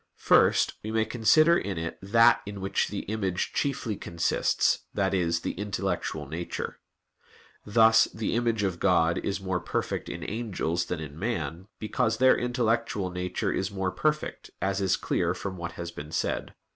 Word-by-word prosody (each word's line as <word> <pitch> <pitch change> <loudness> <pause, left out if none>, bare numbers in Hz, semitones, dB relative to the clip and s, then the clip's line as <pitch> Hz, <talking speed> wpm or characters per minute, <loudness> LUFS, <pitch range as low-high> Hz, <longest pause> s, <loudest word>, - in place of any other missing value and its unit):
First, - - +4
we 110 - -4
may 110 0 +1
consider 125 +9 +4
in 100 - -2
it 80 0 -4
that 115 +4 +5
in 100 -1 -6
which 95 0 0
the - - -4
image 95 -4 -2
chiefly 130 -6 -1
consists, 85 -3 +1 0.2
that 100 -1 +1
is, 85 -3 +1
the - - -2
intellectual 95 -6 -3
nature. 85 +4 -5 0.9
Thus 110 +1 +6
the 110 -1 -3
image 115 -3 +1
of 95 -3 -1
God 85 -3 +3
is 100 0 -2
more 95 -2 -2
perfect - - -3
in - - -6
the - - -5
angels 95 -6 -2
than 85 -2 -4
in 75 0 -8
man, 90 - -3
because 110 +1 0
their 130 +1 +6
intellectual 115 -5 0
nature 90 0 -2
is 95 0 -1
more 95 -2 -2
perfect, 155 +6 -2
as 95 +2 -1
is 95 -2 +2
clear - - 0
from 95 -2 -5
what 85 -1 -6
has 85 -1 -6
been 75 -2 -9
said - - -1
(Q. - - -17
100 Hz, 170 wpm, -27 LUFS, 85-110 Hz, 0.9 s, Thus